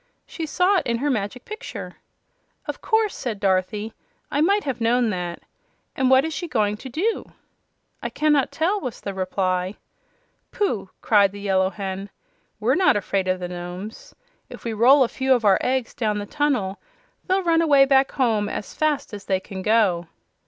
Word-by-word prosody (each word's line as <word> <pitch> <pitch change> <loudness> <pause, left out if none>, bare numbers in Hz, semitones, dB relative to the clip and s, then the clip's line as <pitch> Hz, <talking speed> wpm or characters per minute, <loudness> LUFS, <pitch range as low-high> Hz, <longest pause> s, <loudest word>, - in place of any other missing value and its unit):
"She 325 -2 -6
saw 365 +5 +3
it - - -6
in 235 -1 +1
her 285 +4 0
Magic 215 +1 -3
Picture." 430 +3 -7 0.7
"Of - - -5
course," 440 -2 +1
said 230 -6 -4
Dorothy; 200 +3 0 0.4
"I 290 - +1
might 400 +6 +3
have 265 -4 -3
known 235 0 +2
that. 175 -2 -4 0.5
And 260 -1 +2
what 265 +2 +5
is 320 - -3
she 345 +2 -4
going 210 -8 +1
to 260 - -9
do?" 385 - -2 0.7
"I - - -3
cannot 295 -3 +2
tell," 375 +6 0
was 250 -6 -5
the 200 - -5
reply. 185 0 -1 0.8
"Pooh!" 235 - -1
cried 200 -3 +4
the 205 - -9
Yellow 190 -2 +2
Hen. 195 0 -5 0.5
"We're 230 +5 +2
not 365 - +4
afraid 195 -2 -1
of 185 0 +1
the 180 - -4
Nomes. 180 +4 -8 0.3
If - - -11
we 230 - -3
roll 260 +6 +6
a - - +1
few 265 +2 +2
of 235 -3 -2
our 195 -2 +5
eggs 255 -2 -1
down 215 -3 -1
the 205 - -4
tunnel 250 -8 -1 0.5
they'll 380 0 +2
run 330 -1 +3
away 285 -4 +6
back 270 0 +3
home 220 -6 +1
as - - -5
fast 305 -6 -1
as 205 -1 -7
they 190 -1 +1
can 190 0 -8
go." 195 -5 +2
230 Hz, 180 wpm, -23 LUFS, 195-290 Hz, 0.8 s, roll